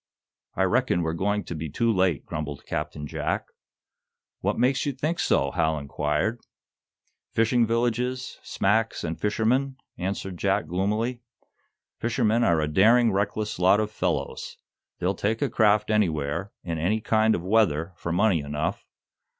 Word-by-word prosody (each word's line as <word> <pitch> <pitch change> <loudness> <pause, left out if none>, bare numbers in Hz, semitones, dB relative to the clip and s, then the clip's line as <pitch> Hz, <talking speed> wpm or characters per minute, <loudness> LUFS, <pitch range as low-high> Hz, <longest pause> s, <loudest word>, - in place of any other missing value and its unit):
"I 95 - +2
reckon 95 -3 +2
we're 80 0 -1
going 100 +4 0
to - - -6
be 80 -1 -5
too 115 +10 +1
late," 95 -6 +1
grumbled 75 -2 -5
Captain 75 - -4
Jack. - - -2 0.9
"What - - -1
makes 125 +2 +2
you 140 - 0
think 155 +6 -2
so?" 70 0 +2
Hal 80 +2 +1
inquired. 75 +9 -1 0.9
"Fishing 115 +1 +3
villages, 120 +2 -1
smacks 110 +3 0
and 85 -1 -4
fishermen," 120 +6 +1 0.2
answered 95 0 -3
Jack, 100 +1 +1
gloomily. 105 +7 -1 0.8
"Fishermen 120 -1 +1
are 85 -5 +3
a 75 - 0
daring, 115 +8 +5
reckless 105 +1 -1
lot 95 +3 +5
of 105 -1 -1
fellows. - - -3 0.4
They'd 90 +2 -1
take 110 +3 0
a 140 -5 -1
craft 105 -1 +3
anywhere, 85 -3 0
in 85 -3 -3
any 100 +7 +1
kind 110 0 +2
of 85 - -4
weather, 90 -5 +2
for 85 - -5
money 95 0 +3
enough. 75 +1 -3
105 Hz, 145 wpm, -26 LUFS, 85-115 Hz, 0.9 s, daring